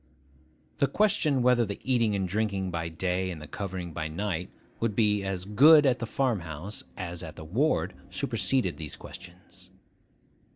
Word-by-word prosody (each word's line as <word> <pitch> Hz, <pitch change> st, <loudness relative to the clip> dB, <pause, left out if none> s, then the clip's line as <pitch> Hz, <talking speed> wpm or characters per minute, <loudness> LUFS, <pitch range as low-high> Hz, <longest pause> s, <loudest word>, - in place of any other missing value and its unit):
The 140 Hz, -, +3 dB
question 150 Hz, -6 st, +2 dB
whether 125 Hz, -1 st, +4 dB
the 100 Hz, -2 st, -4 dB
eating 115 Hz, -5 st, +2 dB
and 95 Hz, -1 st, -1 dB
drinking 100 Hz, -1 st, -1 dB
by 80 Hz, -1 st, -2 dB
day, 90 Hz, +2 st, -1 dB
and 85 Hz, -4 st, -5 dB
the 75 Hz, -, -8 dB
covering 90 Hz, -3 st, -5 dB
by 80 Hz, -1 st, -3 dB
night, 90 Hz, +1 st, -3 dB, 0.3 s
would 115 Hz, -3 st, 0 dB
be 105 Hz, -2 st, +2 dB
as 95 Hz, -2 st, -3 dB
good 145 Hz, +9 st, +7 dB
at 130 Hz, -2 st, +3 dB
the 115 Hz, -, -3 dB
farm 125 Hz, -2 st, +1 dB
house 85 Hz, +4 st, -6 dB
as 85 Hz, -3 st, -4 dB
at 80 Hz, -2 st, -8 dB
the 80 Hz, -, -9 dB
ward 125 Hz, -, +1 dB, 0.2 s
superseded 125 Hz, -10 st, 0 dB
those 80 Hz, -2 st, -5 dB
questions. 90 Hz, +1 st, -11 dB
100 Hz, 165 wpm, -28 LUFS, 90-115 Hz, 0.3 s, good